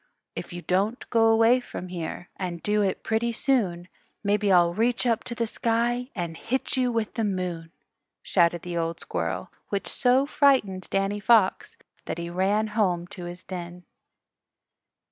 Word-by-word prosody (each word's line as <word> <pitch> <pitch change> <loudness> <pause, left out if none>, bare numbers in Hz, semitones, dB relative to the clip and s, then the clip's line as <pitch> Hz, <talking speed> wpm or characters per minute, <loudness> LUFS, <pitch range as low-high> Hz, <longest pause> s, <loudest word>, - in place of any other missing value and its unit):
"If - - -6
you 175 0 -7
don't 200 +6 0
go 225 -1 +4
away 225 +2 +5
from 185 -6 -8
here, 175 0 -5
And 175 -3 -5
do 210 0 +2
it 195 -2 -1
pretty 225 +1 0
soon, 210 -9 0 0.4
Maybe 205 0 +2
I'll 175 -2 +5
reach 235 +5 +1
up 230 -3 +1
to 235 - -5
the 230 -1 0
sky 235 +2 0
And 170 -4 -3
hit 260 +11 -2
you 255 -2 +1
with 225 -2 -1
the 230 - -1
moon," 180 -5 -3 0.5
shouted 170 -2 +2
the 175 -1 -5
old 165 0 -2
squirrel, - - -3 0.2
which 200 -1 -2
so 255 +2 +3
frightened 260 -11 +2
Danny 195 +1 0
Fox 210 -2 +3 0.3
that - - -4
he 170 0 -5
ran 195 +4 +1
home 180 -6 +1
to 180 - -8
his 175 +1 -8
den. 175 -1 -7
200 Hz, 165 wpm, -26 LUFS, 175-230 Hz, 0.5 s, away